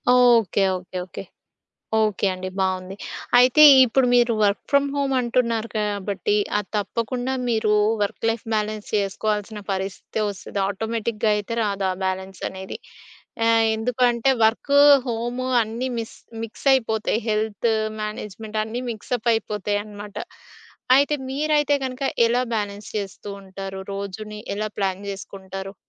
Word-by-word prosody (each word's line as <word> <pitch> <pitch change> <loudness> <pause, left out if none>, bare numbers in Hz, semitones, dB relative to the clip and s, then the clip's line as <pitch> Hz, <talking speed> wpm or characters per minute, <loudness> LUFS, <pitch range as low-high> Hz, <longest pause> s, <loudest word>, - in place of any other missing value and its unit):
Okay. 230 -6 +4
Okay. 185 0 -7
Okay. - - -8 0.8
Okay 210 -2 +1
అండి 185 0 -5
బావుంది. 185 0 -1 0.4
అయితే, 255 +5 +6 0.2
ఇప్పుడు 250 +2 +2
మీరు 240 -1 +4
వర్క్ 200 0 +2
ఫ్రమ్ 280 0 +4
హోమ్ 275 -1 0
అంటున్నారు 235 -2 0
కాబట్టి, 205 -1 -1 0.2
అది 210 - -4
తప్పకుండా 245 +5 -2 0.2
మీరు 220 -2 +2 0.3
వర్క్ 205 - -4
లైఫ్ 225 0 -3
బ్యాలెన్స్ 215 0 -2
చేసుకోవాల్సిన 210 +1 -1
పరిస్థితే 195 +3 -3
వస్తది. 200 0 -6
ఆటోమేటిక్‌గా 220 +1 -1
అయితే 220 +3 -4
రాదు 200 -2 -1
ఆ - - -2
బ్యాలెన్సనేది. 190 0 -4 0.7
ఆహ్, 225 0 +4
ఎందుకంటే 240 +2 +1 0.2
వర్కు, 280 +6 +3 0.3
హోము 240 +2 -2 0.2
అన్నీ 230 +4 -4
మిస్ 225 - -7 0.3
మిక్స్ 230 +5 -9
అయిపోతాయి 220 -3 0
హెల్త్ 215 +1 0 0.3
మ్యానేజ్‌మెంట్ 215 0 -5
అన్నీ 230 +3 -4
మిక్స్ 220 +3 -6
అప్ 235 +1 -1
అయిపోతాయి 210 -2 -1
అనమాట. 205 -1 -10 0.8
అయితే 285 +1 +3
మీరైతే 295 +1 +2
గనక 260 +1 -5 0.2
ఎలా 245 +2 +2
బ్యాలెన్స్ 205 -1 -4
చేస్తూ 200 0 -6
ఉంటారు 195 0 -7
రోజుని 210 +2 -6 0.2
ఎలా 215 +1 -2
ప్లాన్ 190 -1 -1
చేసుకుంటారు? 195 0 -7
215 Hz, 125 wpm, -23 LUFS, 200-235 Hz, 0.8 s, అయితే